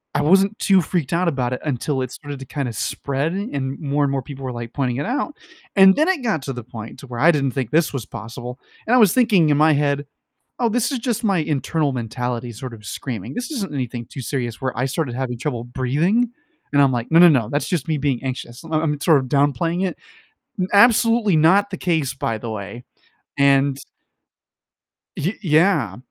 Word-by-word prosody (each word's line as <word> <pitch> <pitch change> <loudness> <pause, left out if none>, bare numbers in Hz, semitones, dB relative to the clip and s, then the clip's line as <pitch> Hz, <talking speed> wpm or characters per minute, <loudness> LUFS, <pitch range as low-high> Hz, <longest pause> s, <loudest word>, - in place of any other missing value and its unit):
I 145 - +2
wasn't 195 +6 +3
too 195 -3 +4
freaked 165 -1 -2
out 175 +1 +1
about 130 -5 0
it - - -5
until 140 -1 -1
it 130 -1 -4
started 145 -2 -8
to 135 - -8
kind 140 0 -3
of 115 - -5
spread 140 +8 -2
and 140 - -3
more, 145 -1 0
and 140 - +1
more 135 -1 -2
people 135 +1 -9
were, 130 - -3
like, 120 -1 -7
pointing 125 -4 -1
it 140 - -2
out. 275 +6 -2 0.4
And 190 -1 +7
then 310 +3 +2
it 370 -8 0
got 215 - 0
to 135 0 -4
the 120 -2 -7
point 115 -2 -9
to 135 - -11
where 120 -1 -6
I 170 +6 +6
didn't 140 -4 0
think 130 -3 -3
this 160 0 +2
was 130 -6 -4
possible, 120 +3 -8 0.3
and 245 - +4
I - - +6
was 215 -7 +6
thinking 210 -11 +4
in 145 - +3
my 155 +1 +5
head, 145 0 0 0.6
"Oh, 235 - +3
this 245 +4 0
is 265 - -1
just 235 -1 -2
my 195 -4 +2
internal 150 0 0
mentality 120 0 -4
sort 120 +2 -8
of 105 - -14
screaming. 115 -6 -5
This 245 +4 -4
isn't 200 - -4
anything 120 -3 -4
too 135 - -8
serious," 120 -2 -3
where 130 -1 -3
I 125 - +1
started 135 -2 -2
having 125 -1 -3
trouble 120 -4 -3
breathing, 150 - 0 0.4
and 145 - +4
I'm 135 -1 +4
like, 120 -1 -3
"No, 165 - +5
no, 175 - +9
no, 130 -9 +2
that's 145 - -1
just 170 -6 -2
me 155 - 0
being 135 -3 -1
anxious." 125 0 -6
I'm 155 -2 0
sort 155 -2 +5
of 130 - -3
downplaying 145 +7 +1
it, - - -4 0.8
absolutely 230 -1 +5
not 190 +6 +4
the 190 - -5
case, 160 -7 0
by 115 -4 -2
the 115 +1 -6
way, 110 +3 -7 0.6
and 140 0 +3 1.4
Y 180 +8 -1
yeah, 155 - +2
145 Hz, 215 wpm, -21 LUFS, 125-175 Hz, 1.4 s, no